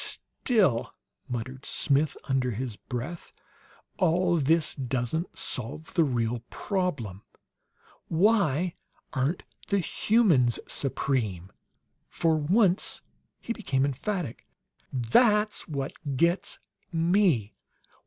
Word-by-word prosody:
"Still," 185 - +2 0.3
muttered 130 +3 -5
Smith, 145 +1 +1
under 130 -2 0
his 120 0 -4
breath, 125 +10 -6 0.7
"all 175 -1 +3
this 160 +2 +2
doesn't 130 +5 -2
solve 145 +4 -2
the 170 - +4
real 120 -4 0
problem. 145 - -2 0.9
Why 180 -3 +2 0.4
aren't 140 +6 0 0.2
the 200 - +2
HUMANS 175 - +3
supreme?" 110 -10 -1 0.6
For 165 -1 +1
once 180 +5 +2 0.4
he 235 - -3
became 135 -12 0
emphatic. 155 - -3 0.4
"That's 210 - +3
what 140 -4 -3 0.2
gets 170 +5 +1 0.3
me! 165 - +2
150 Hz, 90 wpm, -28 LUFS, 125-180 Hz, 0.9 s, the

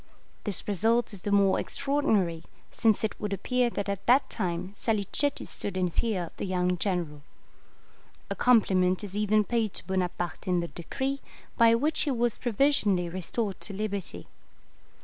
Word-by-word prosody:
This 205 -5 -1
result 225 +3 +2
is 195 - -4
the 205 - -3
more 200 -1 +4
extraordinary, 220 - 0 0.3
since 225 -2 +2
it 220 - 0
would 210 -1 -2
appear 250 +5 +1
that 205 -3 -4
at 200 -1 -4
that 255 +4 +4
time 180 -2 -3
Salicetti 225 +7 0
stood 195 -2 -3
in 180 -1 0
fear 200 0 0
of 170 - -10
the - - -3
young 180 -1 +1
general. 170 -7 -1 1.1
A - - 0
compliment 190 -6 +3
is 200 -1 -6
even 210 0 +3
paid 220 -1 -1
to - - -3
Bonaparte 180 -1 -3
in 180 -1 +2
the 170 0 -3
decree, 270 - -3 0.3
by 230 -1 +6
which 305 +6 0
he 300 - +2
was 240 -3 0
provisionally 215 -7 +2
restored 185 +3 -3
to 205 - -3
liberty. 195 - -4
200 Hz, 160 wpm, -28 LUFS, 180-230 Hz, 1.1 s, by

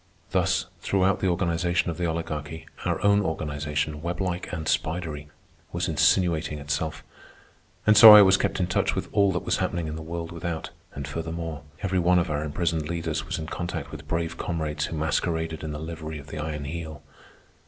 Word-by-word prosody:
Thus, - - +1
throughout 95 -1 +1
the 95 - 0
organization 85 -1 +1
of 80 - -7
the 85 - +1
Oligarchy, 80 -1 -4 0.2
our - - 0
own 100 0 +5
organization, 75 -3 -2
weblike 90 +1 -3
and 80 -3 -4
spidery, 80 -3 -2 0.4
was - - -1
insinuating 85 -5 +2
itself. 75 +1 -3 0.8
And 110 - +6
so 105 0 +12
I 105 - +10
was 95 0 +6
kept 95 0 -1
in 90 - +2
touch 90 - 0
with - - -3
all 100 -2 +3
that 90 - -2
was - - +1
happening 85 -1 -1
in 75 - -4
the - - -6
world 85 +1 -5
without. 85 -1 -4 0.2
And 70 0 -5
furthermore, 80 0 -4 0.2
every 95 -1 +1
one 90 +1 +4
of 85 -3 +1
our 75 0 -1
imprisoned 80 0 -1
leaders 85 -2 -3
was 95 - -2
in 80 - -5
contact 85 +2 -5
with - - -9
brave 85 0 -2
comrades 75 -3 -2
who 80 - -5
masqueraded 80 0 -1
in 80 - -4
the 75 - -4
livery 80 -1 -6
of 70 0 -11
the 75 - -6
Iron 75 -1 -4
Heel. 80 0 -6
80 Hz, 185 wpm, -26 LUFS, 75-90 Hz, 0.8 s, so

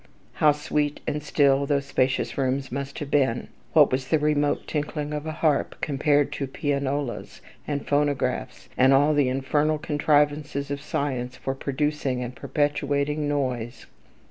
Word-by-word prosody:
How 150 +4 +4
sweet 150 0 -1
and 150 - -2
still 140 -1 +2
those 140 -1 +1
spacious 130 -1 0
rooms 135 0 -1
must 140 +2 -4
have 145 -1 -6
been! 130 -5 +1 0.2
What 150 -3 +6
was 130 +1 -1
the 160 - +3
remote 150 -1 +1
tinkling 150 0 -3
of 150 +1 -4
a - - -2
harp, 155 -2 0
compared 145 0 +1
to 140 -2 -3
pianolas, 140 -1 -2 0.3
and 145 -2 -3
phonographs, 145 -1 -1
and 130 +1 +5
all 145 +3 +4
the 145 -3 +3
infernal 145 +4 +1
contrivances 145 -1 +1
of 140 0 -3
science 130 -4 -3
for 135 - -3
producing 135 -1 -1
and 125 +1 -6
perpetuating 145 +1 0
noise? 125 -4 -2
145 Hz, 145 wpm, -25 LUFS, 135-150 Hz, 0.3 s, What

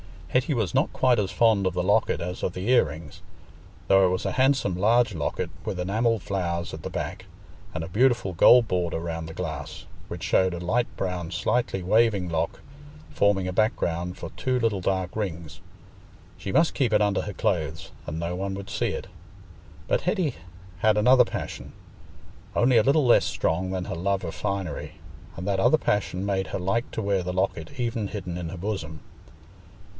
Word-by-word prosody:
Hetty 130 +4 +1
was 110 -6 -1
not - - +2
quite 125 -3 +3
as 100 -2 0
fond 110 -4 +3
of 90 - -1
the 90 0 -1
locket 105 0 +2
as 90 +2 -4
of 90 - -1
the 95 +5 -4
ear 125 -7 +6
rings, 75 -1 -9 0.7
though 95 0 +6
it - - +1
was 90 0 -2
a - - 0
handsome 130 -8 +2
large 110 +4 +3
locket, 80 -4 -3
with - - -3
enamelled 110 +3 0
flowers 85 -3 -2
at - - -7
the - - -4
back - - -5 0.5
and 80 - -2
a - - -5
beautiful 120 -2 +2
gold 115 +7 +7
border 90 -4 -1
round 80 -1 -4
the 80 - -8
glass, 80 -3 -6 0.2
which 85 +2 -7
showed 95 0 +2
a - - -4
light 110 +8 0
brown 90 -3 -3
slightly 95 +2 0
waving 100 -2 +2
lock, 80 0 -2 0.5
forming 100 -2 +2
a 90 - -3
background 90 -4 0
for - - -6
two 130 -1 -1
little 115 -4 +1
dark 95 -1 -1
rings. 85 -7 -4 0.8
She 95 - -5
must 165 0 +3
keep 125 -6 +1
it - - +4
under 105 -1 +1
her 105 - -5
clothes, 80 -9 -2 0.2
and 75 +1 -4
no 85 +1 -2
one 95 +2 -3
would 100 0 -7
see - - -1
it. - - -4 0.8
But - - +1
Hetty 180 - 0 0.4
had 105 +1 +3
another 125 +4 +6
passion, - - -6 0.8
only 120 0 +4
a 110 - +5
little 140 +3 +3
less 120 - +5
strong 90 +4 -1
than 95 -1 -3
her - - -4
love 95 +3 -1
of 85 - -4
finery, 100 -4 -4 0.4
and 90 - -6
that 100 -1 0
other 120 +10 +5
passion 100 -7 -1
made 95 -1 -1
her - - -4
like 100 +6 -1
to 110 - -3
wear 100 -2 +1
the 90 +1 -4
locket 90 -2 -2
even 115 -3 -1
hidden 95 -4 -5
in 85 -2 -4
her 95 - -7
bosom. 85 -6 -4
95 Hz, 190 wpm, -26 LUFS, 90-110 Hz, 0.8 s, gold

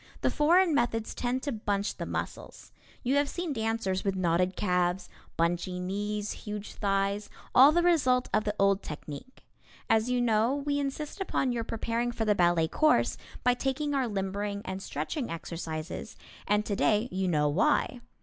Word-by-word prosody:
The - - +2
foreign 335 +3 +4
methods 230 -4 0
tend 255 +1 -2
to 285 - -1
bunch 205 -3 -2
the - - -4
muscles. - - -6 0.3
You 265 +2 +2
have 285 0 +2
seen 345 -4 -3
dancers 220 -5 -1
with 195 -1 0
knotted 180 0 +1
calves, 180 -1 0 0.3
bunchy 175 +2 0
knees, 205 +3 -2
huge 210 0 -6
thighs, 200 0 0 0.2
all 270 +4 +8
the 345 +2 +2
result 260 -8 +3
of 215 - +3
the 210 -1 -2
old 195 0 +3
technique. 150 - -9 0.5
As 225 +2 +3
you 250 0 +1
know, 230 +2 +2
we 285 0 -1
insist 285 +6 -4
upon 270 -8 0
your 235 -1 -1
preparing 230 +2 -2
for 225 -2 -2
the 210 - +4
ballet 175 -3 +3
course 310 - +3 0.3
by 250 - +4
taking 270 +3 -1
our 265 -3 +1
limbering 200 0 -3
and 190 0 -4
stretching 190 - -3
exercises, 165 +3 -5 0.3
and 210 +1 +2
today 210 +2 +2
you 190 0 -1
know 150 -4 +2
why. 240 - +1
210 Hz, 165 wpm, -29 LUFS, 190-255 Hz, 0.5 s, all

